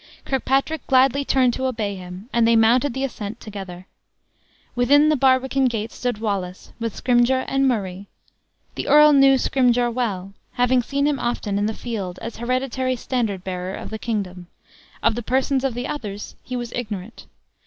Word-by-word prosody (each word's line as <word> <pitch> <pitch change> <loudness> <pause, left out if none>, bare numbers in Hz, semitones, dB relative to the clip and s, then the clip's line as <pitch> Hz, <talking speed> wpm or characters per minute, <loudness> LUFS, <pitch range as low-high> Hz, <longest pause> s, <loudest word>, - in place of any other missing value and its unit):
Kirkpatrick 270 +3 0
gladly 270 +1 +4
turned 255 -3 +2
to 260 +2 -1
obey 215 -5 -2
him; 180 +2 -9
and 235 -1 +3
they 230 - +4
mounted 235 +4 +3
the 265 - -2
ascent 225 -4 -5
together. 190 -4 -8 0.9
Within 285 +5 +4
the 305 - +3
barbican 265 0 +2
gate 225 -2 -1
stood 245 -3 -3
Wallace, 195 -4 -4
with 230 -2 -3
Scrymgeour 250 +1 +2
and 270 0 +2
Murray. 200 -5 -2 0.7
The - - -5
earl 300 +1 +7
knew 275 -1 +6
Scrymgeour 245 -2 +2
well, 200 -6 -3 0.2
having 250 +1 +3
often 240 - -4
seen 280 0 +1
him 290 -2 +1
in 205 -4 -1
the 220 - -3
field 200 -7 -5
as 230 - -7
hereditary 255 +1 -1
standard 230 -7 -2
bearer 185 0 -4
of - - -8
the 220 - -5
kingdom; 185 -6 -4 0.6
of 225 - +3
the 240 - -4
persons 265 +3 0
of 265 -4 -1
the 245 - -3
others 210 -8 -6
he 255 - -6
was 240 -1 -5
ignorant. 215 -3 -6
240 Hz, 170 wpm, -22 LUFS, 210-260 Hz, 0.9 s, earl